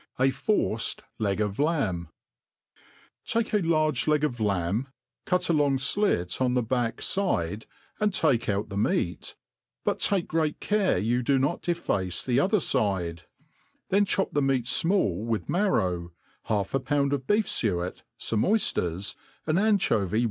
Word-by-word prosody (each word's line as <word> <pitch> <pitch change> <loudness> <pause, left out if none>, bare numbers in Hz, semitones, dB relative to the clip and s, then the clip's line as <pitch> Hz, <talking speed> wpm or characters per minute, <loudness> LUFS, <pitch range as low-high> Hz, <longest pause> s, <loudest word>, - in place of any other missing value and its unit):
A 135 +1 +3
forced 125 - 0 0.2
Leg 100 -3 0
tf 105 -2 -1
LaMr* 135 - 0 1.2
TAKE 230 -1 -1
z 210 - +2
large 155 -3 +1
leg 150 -1 +2
of 125 -6 -1
lamb, 100 +3 0 0.4
cut 180 0 +1
a 170 - +2
long 145 -3 +2
flit 130 - 0
on 125 -1 +2
the 125 - +2
fcack 120 0 -1
ttAt 110 - -1 0.3
and 210 0 +2
take 135 - +1
out 105 +1 -1
the 100 - -5
meat, 90 -3 -1 0.5
but - - 0
take 195 -4 +2
grc^at 155 -2 -1
cai*e 205 - +1
you 120 +2 +1
do 135 +3 +2
|i6t 140 +6 0
deface 100 - -1
the 125 0 +2
other 200 +7 +3
fide; 90 - -1 0.6
then 200 +2 +4
chop 195 -1 0
the 145 - +2
me^t 135 -3 +1
freall 125 - +1
with 115 -2 -2
marrow, 95 - 0 0.3
half 100 -3 -1
a 135 - +2
pound 140 0 0
of 135 -2 -3
beef 210 +1 +3
fuet, 90 -5 -1 0.2
fomeoyfters, 105 - 0 0.3
an 155 +3 +1
anchovy 200 - +2
w? - - +3
130 Hz, 155 wpm, -27 LUFS, 100-170 Hz, 1.2 s, then